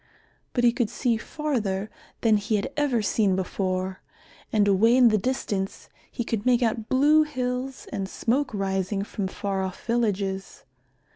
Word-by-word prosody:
But 245 - 0
he 240 - +6
could 240 -3 -1
see 240 0 0
farther 220 -7 -2 0.3
than 220 -2 +4
he 210 +2 -1
had 210 +7 -2
ever 275 -7 +1
seen 205 -2 +2
before, 185 0 -2 0.5
and 210 -2 +3
away 220 +5 +4
in 250 -2 +7
the 215 - +3
distance 200 -4 -3 0.2
he 240 - -3
could 225 -2 -2
make 250 0 +3
out 225 -1 -1
blue 295 +4 +5
hills 255 -3 -3
and 195 -3 -3
smoke 255 +6 0
rising 195 -1 -1
from 200 -1 -3
far 195 0 -3
off 185 -1 -6
villages. 200 -5 -1
220 Hz, 155 wpm, -25 LUFS, 195-250 Hz, 0.5 s, in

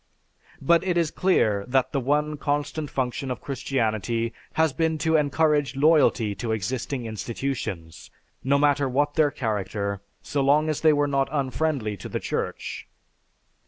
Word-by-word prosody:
But 170 +4 +4
it 180 -2 0
is 165 -3 +1
clear 110 - +2
that 130 0 +1
the 140 - 0
one 150 +3 0
constant 145 +1 -2
function 130 0 -2
of 125 - -3
Christianity 115 -4 -1 0.2
has 160 -3 +2
been 160 +2 0
to 160 +1 +1
encourage 150 -1 +2
loyalty 140 -7 +3
to 115 -2 -3
existing 120 +4 -3
institutions, 110 -7 -5 0.3
no 140 +2 +3
matter 145 -1 +2
what 145 +3 +1
their 155 -1 +3
character 100 -5 -3 0.2
so 145 - -1
long 150 +3 +3
as 155 - -2
they 160 - +6
were 145 -1 +2
not 140 -1 0
unfriendly 135 -6 -1
to - - -8
the - - -2
Church. - - -4
140 Hz, 150 wpm, -25 LUFS, 120-150 Hz, 0.3 s, they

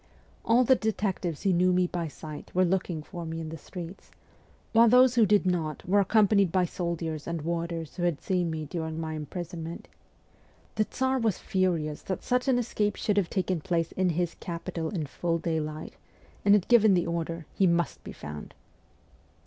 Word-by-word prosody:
All 235 +2 +4
v - - -4
the 260 - +8
detectives 195 -7 -2
who 195 - +3
knew 180 +1 +3
me 180 0 +3
by 175 -2 -3
sight 155 0 -9
were 185 0 +4
looking 175 -3 -1
for 175 +1 -7
me 165 0 -4
in 160 -1 -5
the 165 - -6
streets; 180 +3 -9 0.6
while 230 +1 +7
those 250 +1 +6
who 230 -4 +4
did 205 -1 +4
not 170 -4 -1
were 200 +3 +4
accompanied 200 -2 +4
by 185 0 +3
soldiers 165 -3 -3
and 170 -2 -3
warders 170 -1 -3
who - - -3
had 175 -4 +1
seen 180 -3 0
me 160 -1 -3
during 160 +1 -4
my 160 -1 -3
imprison 165 +2 -5
ment. 165 +1 -7 0.9
The 215 - +1
Tsar 260 +3 0
was 225 -5 +1
furious 170 -6 -1
that 190 - -4
such 250 +1 0
an 260 -2 +4
escape 215 -3 0
should 205 -1 -1
have 195 -4 +2
taken 185 -3 -1
place 170 -1 -1
in 185 -1 +1
his 175 -1 0
capital 170 -1 -4
in 170 -7 -3
full 165 +4 -1
daylight, 155 -2 -3 0.5
and 205 0 +6
had 200 - +1
given 220 -5 +6
the 175 - +1
order, 165 -1 -3
' - - -29
He 190 - +5
must 170 0 0
be - - -7
found.' 75 0 -8
175 Hz, 195 wpm, -28 LUFS, 165-200 Hz, 0.9 s, the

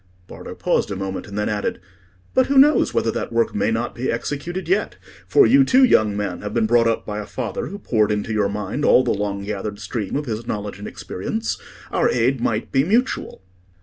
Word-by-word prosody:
Bardo - - -9
paused - - 0
a 100 - -3
moment, 95 0 -4
and 100 0 -7
then 105 - 0
added— 105 -1 -2 0.5
"But 260 -1 +3
who 280 - +1
knows 290 +3 +5
whether 115 - +1
that - - -4
work 115 0 +1
may 105 +1 +1
not 115 +1 -1
be 125 +2 -2
executed 150 +10 -4
yet? 380 - 0 0.3
For 415 - +6
you, 275 +2 +6
too, 260 0 +4
young 110 - +4
man, 100 -4 -3
have 105 +1 -5
been 115 -2 +2
brought 115 +1 +4
up 115 - 0
by 105 0 -4
a 105 - -6
father 120 -6 -4
who 200 - -7
poured 110 - +1
into 105 +1 -2
your 105 -2 +1
mind 105 +7 -3
all 130 - +5
the - - 0
long 100 -1 -2
gathered 100 0 -4
stream 105 -1 -4
of 145 +1 -1
his 115 -1 -4
knowledge 105 -2 -4
and 105 - -7
experience. 110 +4 -4 0.3
Our - - +2
aid 125 +1 +1
might 110 -1 -1
be 135 - +3
mutual." 220 - 0
110 Hz, 215 wpm, -21 LUFS, 105-135 Hz, 0.5 s, For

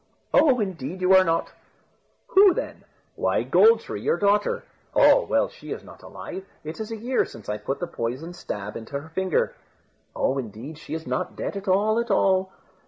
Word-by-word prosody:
"Oh! 265 -5 +5
indeed 185 -4 -4
you 185 +1 +4
are 190 0 +8
not." 165 -2 0 0.8
"Who 385 -2 +6
then?" - - -5 0.3
"Why, - - +1
Gold 455 +1 +5
tree, - - -6
your 460 - +1
daughter." 205 0 +2 0.3
"Oh! - - +6
well, - - +2
she - - -12
is - - -5
not - - -14
alive. 190 - -8 0.2
It 155 +5 -7
is 220 0 -4
a 225 - -4
year 245 +4 +1
since 115 - -11
I 105 0 -2
put 135 +7 -3
the 175 - -2
poisoned 135 +6 -4
stab 105 - -6
into 140 +5 -5
her 155 +3 -12
finger." 185 +1 0 0.6
"Oh! 135 - 0
indeed 125 +6 -7
she 160 - -6
is 160 - -6
not 125 0 -3
dead - - -4
at 200 +1 -6
all, 210 +4 +3
at 235 - -2
all." 190 0 +2
185 Hz, 190 wpm, -25 LUFS, 140-210 Hz, 0.8 s, are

